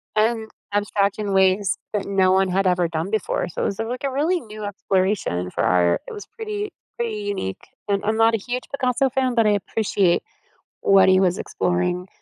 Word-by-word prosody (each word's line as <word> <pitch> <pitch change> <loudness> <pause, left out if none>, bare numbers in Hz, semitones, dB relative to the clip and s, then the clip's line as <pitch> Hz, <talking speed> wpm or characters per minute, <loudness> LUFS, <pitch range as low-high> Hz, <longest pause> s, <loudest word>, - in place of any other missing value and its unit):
And 220 0 +1 0.2
abstract 205 0 0
in 200 -2 -2
ways 190 +1 +3 0.2
that 205 -2 -1
no 190 -2 +3
one 190 0 +3
had 190 +2 0
ever 180 -1 +2
done 165 +2 -3
before, 215 -4 -1
so - - -5
it - - +1
was 200 - -2
a 225 - 0
like, 250 +4 -5
a 270 - -1
really 320 +7 +1
new 215 -3 -9
exploration 190 - -1
for - - -2
art. 90 -1 +3
It - - -7
was 415 - -8
pretty, 425 -2 -5 0.3
pretty 230 -3 -2
unique, 200 - -4 0.2
and 200 -1 +1
I'm 215 - +1
not 225 0 +4
a - - +3
huge 245 +4 -4
Picasso 265 -1 +1
fan, 260 -1 0
but 230 - +4
I 210 - +4
appreciate 200 -2 +1 0.6
what 195 -1 +5
he 185 0 +5
was 185 -1 +2
exploring 180 0 -1
205 Hz, 200 wpm, -22 LUFS, 185-230 Hz, 0.6 s, what